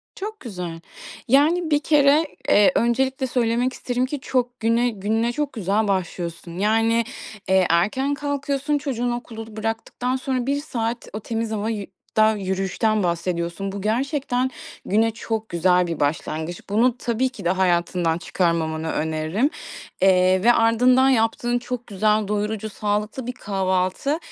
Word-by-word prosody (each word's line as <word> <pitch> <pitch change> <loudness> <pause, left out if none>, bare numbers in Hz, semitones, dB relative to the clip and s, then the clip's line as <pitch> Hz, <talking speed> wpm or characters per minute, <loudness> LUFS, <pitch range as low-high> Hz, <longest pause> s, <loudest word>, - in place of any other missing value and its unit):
Çok 425 +2 -6
güzel. 180 - -6 0.5
Yani, 310 +6 +3
bir 290 - +4
kere, 295 +1 +4 0.2
eee, 205 +6 +6
öncelikle 260 +3 +1
söylemek 245 +1 +1
isterim 250 0 -1
ki 285 +2 -4
çok 250 -1 -1
güne 230 +2 +2
gününe 225 +2 -1
çok 290 +2 -2
güzel 210 0 0
başlıyorsun. 175 -2 -3
Yani, 225 +3 +2 0.5
eee, 190 -1 +4
erken 215 +12 +2
kalkıyorsun, 285 0 -1
çocuğunu 245 -4 -2
okulu 225 -2 -9
bıraktıktan 225 +3 -2
sonra 260 -1 -2
1 280 +2 0
saat 235 -5 -3
o 215 - -3
temiz 225 +1 -3
hava 215 0 -2
yü 210 -3 -3 0.3
da 215 0 +6
yürüyüşten 195 +2 0
bahsediyorsun. 170 +2 -2
Bu 195 0 -6
gerçekten 255 +3 0 0.4
güne 225 +3 +2
çok 225 0 -4
güzel 180 +1 +3
bir 165 -2 -4
başlangıç. 160 +3 -2
Bunu 235 +4 +2
tabii 250 +1 0
ki 255 - -11
de 175 - +3
hayatından 175 -2 +1
çıkarmamanı 160 -3 -1
öneririm, 160 - 0 0.5
eee, 185 0 +4
ve 240 - +6
ardından 250 +3 +4
yaptığın 240 0 +1
çok 245 0 -5
güzel, 210 +1 +1
doyurucu, 210 +1 -2
sağlıklı 210 +4 -2
bir 250 - -2
kahvaltı. 190 - -1
225 Hz, 140 wpm, -23 LUFS, 190-250 Hz, 0.5 s, eee